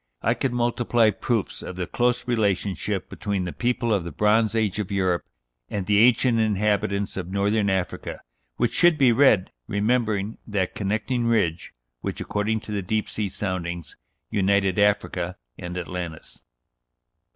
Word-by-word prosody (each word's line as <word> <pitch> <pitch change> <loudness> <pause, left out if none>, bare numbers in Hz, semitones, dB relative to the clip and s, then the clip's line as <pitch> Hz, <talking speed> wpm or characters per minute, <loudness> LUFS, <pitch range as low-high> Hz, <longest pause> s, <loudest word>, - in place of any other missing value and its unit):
I - - +3
could 135 - -1
multiply 120 -2 +2
proofs 110 -1 -2
of 90 - -7
the 90 -1 -2
close 125 +5 0
relationship 100 - 0
between 100 -2 -3
the 90 - -3
people 120 -2 0
of 100 -4 +1
the 85 - -6
Bronze 105 +5 +2
Age 110 -3 0
of 105 -1 -3
Europe 95 -3 +1 0.5
and 100 -2 -3
the 105 0 +3
ancient 120 0 +4
inhabitants 100 -2 0
of 90 -2 -4
Northern 100 +2 +1
Africa, 95 -2 -2 0.3
which 120 -1 0
should 175 -3 +4
be 135 -4 +5
read 115 -6 +4 0.2
remembering 105 -1 0
that 100 -4 -1
"connecting 110 +4 -1
ridge" 85 -8 +1 0.3
which, - - -4
according 105 +1 -1
to 110 - -9
the 100 -1 -1
deep 105 +3 -1
sea 105 -2 -2
soundings, 90 -4 -4 0.4
united 100 -1 +2
Africa 95 -3 +1 0.2
and 90 0 -5
Atlantis. 90 -2 -6
105 Hz, 150 wpm, -24 LUFS, 95-115 Hz, 0.5 s, be